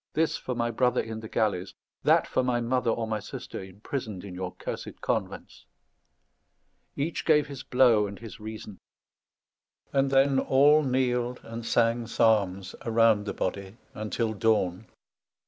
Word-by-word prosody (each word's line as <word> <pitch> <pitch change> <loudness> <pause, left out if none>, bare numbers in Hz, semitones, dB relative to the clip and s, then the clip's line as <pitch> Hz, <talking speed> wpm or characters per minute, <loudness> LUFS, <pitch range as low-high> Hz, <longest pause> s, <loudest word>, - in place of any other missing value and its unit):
This 160 +1 +1
for 125 - -4
my 120 0 0
brother 125 +2 +2
in 110 -1 -4
the 110 -1 -9
galleys. 100 -4 -1 0.3
That - - +4
for 130 - 0
my 125 -1 +1
mother 120 0 0
or 115 0 0
my 110 -1 -2
sister 100 - -7
imprisoned 100 +1 -6
in 100 -2 -8
your 90 0 -5
cursed - - -6
convents." - - -4 1.3
Each 155 +4 -2
gave 150 -3 +4
his 140 -3 -8
blow 125 -6 +4
and 100 0 -8
his 110 -4 -10
reason; 110 -2 -8 1.1
and 135 0 +2
then 135 0 +4
all 145 +4 +5
kneeled 125 -2 0
and 115 +1 -7
sang 115 +1 +1
psalms 100 -5 +1
around 115 -3 +3
the - - -2
body 100 +2 -4 0.3
till 115 0 -1
the 105 - -13
dawn. 105 -2 +1
115 Hz, 150 wpm, -27 LUFS, 105-130 Hz, 1.3 s, all